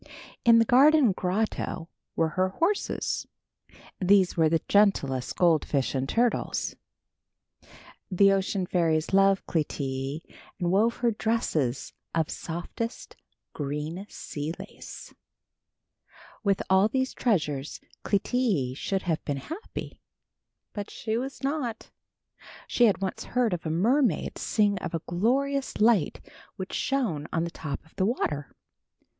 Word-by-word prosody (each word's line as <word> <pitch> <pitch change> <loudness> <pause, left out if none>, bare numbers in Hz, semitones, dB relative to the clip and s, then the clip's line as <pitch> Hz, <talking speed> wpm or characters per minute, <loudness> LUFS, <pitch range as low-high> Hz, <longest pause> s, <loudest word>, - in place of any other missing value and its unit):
In 230 -1 +7
the 230 - +5
garden 275 0 +6
grotto 185 -2 -2 0.3
were 165 -1 +2
her 185 +4 +1
horses. 340 - -1 0.7
These 190 -1 +4
were 160 -2 +4
the 165 0 +1
gentlest 140 -11 +2
goldfish 155 -5 +2
and 135 0 -1
turtles. 240 0 0 1.3
The 195 +1 +5
ocean 195 -1 0
fairies 165 -2 +1
loved 195 0 +4
Clytie 140 -2 -2 0.4
and 175 -2 0
wove 220 +5 +3
her 235 - +4
dresses 165 - -1 0.2
of 160 -2 +1
softest 175 +8 -5 0.4
green 150 +6 -4
sea 150 +1 -5
lace. - - -10 1.3
With 200 -2 +1
all 190 +2 +5
these 260 +3 -1
treasures 150 - -1 0.2
Clytie 200 - +1
should 190 +6 -2
have 165 -3 -1
been 145 -2 -2
happy, 325 - -7 0.7
but 205 -1 -5
she 220 -1 -3
was 270 +3 -4
not. 270 -6 -3 0.7
She 240 - +3
had 200 -3 +2
once 190 - -3
heard 245 -5 0
a 165 -2 -3
mermaid 220 - +1
sing 205 -3 +1
of 170 - -4
a 165 - -2
glorious 265 +10 0
light 215 -6 +2 0.3
which 190 0 -6
shone 210 - -1
on 165 - 0
the 170 - -3
top 145 -3 -6
of 160 - -24
the 190 - +2
water. 145 - -2
190 Hz, 125 wpm, -27 LUFS, 160-230 Hz, 1.3 s, In